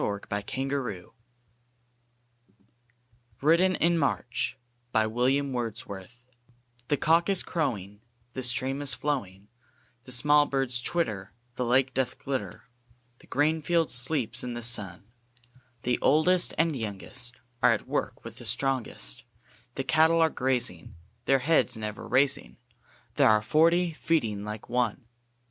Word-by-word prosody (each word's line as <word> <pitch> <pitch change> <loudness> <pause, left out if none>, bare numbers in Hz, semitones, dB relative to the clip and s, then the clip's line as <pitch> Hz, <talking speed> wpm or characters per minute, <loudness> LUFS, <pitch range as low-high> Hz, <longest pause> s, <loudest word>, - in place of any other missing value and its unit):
Percy 100 0 -2
Bysslie 100 0 -2
SJielley 135 +1 -3
RAINBOW 125 -10 -3
GOLD - - -23 2.3
WRITTEN 175 +5 +4
IN 170 +1 +2
MARCH 125 -3 -1 2.3
THE 145 - +1
Cock 165 +4 +3
is 195 -2 +3
crowing, 105 - -3 0.3
The 130 - -4
stream 130 +3 0
is 135 -5 +1
flowing, 110 -8 -3 0.6
The 125 - -10
small 145 +4 +4
birds 130 -3 0
twitter, 105 - -2 0.2
The 125 0 -2
lake 130 +2 +2
doth 130 -1 -1
glitter, 130 -9 -5 0.6
The - - -19
green 155 +3 +1
field 170 0 +1
sleeps 125 0 +1
in 125 -1 -4
the 120 - -5
sun; 105 -7 +1 0.8
The 125 0 0
oldest 170 +6 +4
and 165 -3 +2
youngest 115 +2 -3 0.3
Are - - +6
at - - -2
work - - -3
with - - -9
the - - -8
strongest; 120 - -1 0.5
The 135 - -2
cattle 160 +4 +3
are 160 -1 +4
grazing, 125 -12 -2 0.3
Their 135 - +4
heads 150 -6 +2
never 105 -1 -6
raising; 130 - +1 0.6
There - - +5
are 110 0 +5
forty 170 +6 +3
feeding 115 -11 -1
like 105 0 -7
one! 120 -2 -1
130 Hz, 130 wpm, -27 LUFS, 110-155 Hz, 2.3 s, Are